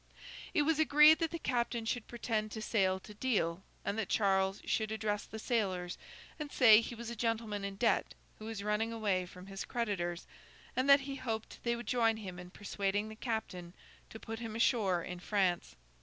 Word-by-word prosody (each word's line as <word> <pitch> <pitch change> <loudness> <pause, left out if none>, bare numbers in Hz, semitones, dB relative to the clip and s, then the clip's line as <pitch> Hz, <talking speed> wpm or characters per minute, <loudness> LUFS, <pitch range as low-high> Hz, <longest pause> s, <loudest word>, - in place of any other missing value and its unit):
It 300 - +4
was 315 +1 +2
agreed 305 +1 +7
that 330 -1 +1
the 335 - -4
captain 240 -5 -1
should 230 0 -2
pretend 225 -2 -2
to 220 - -4
sail 190 -4 +1
to 210 - -11
Deal, 200 -7 0 0.2
and 205 +2 -1
that 215 - -2
Charles 195 -1 +2
should 220 -1 0
address 210 -1 -1
the 220 - -8
sailors 190 -6 -1 0.4
and 295 -1 -5
say 225 -4 +7
he 235 - -6
was 235 0 -6
a - - -5
gentleman 225 -3 -1
in 200 0 -4
debt 230 +3 +1 0.2
who 215 - -8
was 220 -2 -5
running 210 +2 0
away 200 -5 0
from 180 +1 -12
his 195 0 -6
creditors, 190 -7 -2 0.5
and 260 +2 +1
that 280 0 +8
he 275 0 -5
hoped 225 -4 -4
they 235 0 0
would 235 0 -7
join 230 -3 +2
him 185 -4 -7
in 180 0 -9
persuading 205 +1 -2
the 220 - -9
captain 205 -7 -4 0.3
to 220 - -9
put 225 0 -6
him 225 -2 -5
ashore 210 -7 +2
in 180 -1 -6
France. 185 -2 0
220 Hz, 195 wpm, -33 LUFS, 195-235 Hz, 0.5 s, that